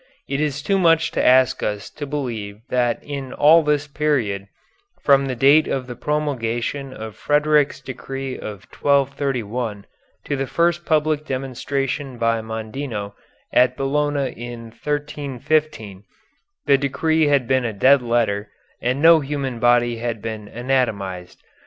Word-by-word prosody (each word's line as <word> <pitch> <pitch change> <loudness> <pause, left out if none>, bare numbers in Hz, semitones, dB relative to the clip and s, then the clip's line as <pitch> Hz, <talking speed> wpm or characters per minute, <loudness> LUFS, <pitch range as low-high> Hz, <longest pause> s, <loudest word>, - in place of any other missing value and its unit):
It 140 +1 -1
is 145 -2 -2
too 195 -1 +1
much 165 -2 +3
to - - 0
ask 130 0 +4
us 105 0 -3
to 145 - -7
believe 115 -8 -4
that 120 -2 +1
in 140 -3 -6
all 160 +3 +6
this 150 -1 +1
period, 130 -10 -1 0.5
from 140 -1 +4
the 130 - -2
date 140 +5 +5
of 130 -2 -2
the 125 -1 -7
promulgation 135 -2 -2
of 110 -3 -8
Frederick's 150 0 +2
decree 135 +1 -6
of 100 -5 -8
1231 125 -6 -1 0.4
to 145 - -1
the 135 -1 -2
first 170 +2 0
public 155 -1 +1
demonstration 135 0 -3
by 115 -1 +1
Mondino, 110 -1 -5 0.4
at 125 0 +4
Bologna 140 0 0
in 120 -1 -8
1315, 145 -6 -2 0.6
the 140 -1 +4
decree 155 +3 +1
had 140 -4 +2
been 130 -1 +2
a 120 - -1
dead 130 +7 +4
letter 115 -4 0 0.3
and 130 +4 -1
no 165 0 +8
human 135 -4 -3
body 120 0 +3
had 115 -1 -3
been 110 -1 -6
anatomized. 105 -8 -2
135 Hz, 140 wpm, -21 LUFS, 115-145 Hz, 0.6 s, no